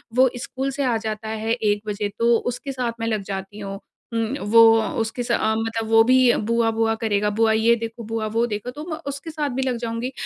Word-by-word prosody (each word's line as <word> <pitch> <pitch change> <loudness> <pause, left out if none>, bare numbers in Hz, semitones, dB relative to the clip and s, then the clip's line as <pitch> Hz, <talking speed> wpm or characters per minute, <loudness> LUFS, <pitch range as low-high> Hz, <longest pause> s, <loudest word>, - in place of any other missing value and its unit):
वो 260 +1 +5
स्कूल 270 +1 -3
से 280 +1 -2
आ 250 -3 +1
जाता 220 0 -5
है 220 0 -3
1 210 -3 0
बजे 205 0 -2
तो 235 0 +4
उसके 245 +4 -4
साथ 250 -3 -2
मैं 225 - -2
लग 215 -3 -1
जाती 195 +2 -6
हूँ। 195 -1 -6 0.3
उम, 230 +3 -1
वो 230 +1 +7 0.2
अ, 220 - -1
उसके 225 +2 -2
स 240 - -3
अ, 220 -1 +2
मतलब 225 0 -2
वो 225 0 +6
भी 255 +3 +4 0.3
बुआ-बुआ 225 -1 +2
करेगा, 210 -2 +1
बुआ 225 -1 +4
ये 225 +2 +4
देखो, 230 0 -6
बुआ 225 0 -3
वो 230 +1 +3
देखो, 210 +2 -4
तो 295 +4 -8
मैं 315 - -3
उसके 280 +4 -7
साथ 300 -2 -2
भी 265 - 0
लग 255 -2 -1
जाऊँगी। 235 +2 -3
225 Hz, 230 wpm, -22 LUFS, 220-245 Hz, 0.3 s, वो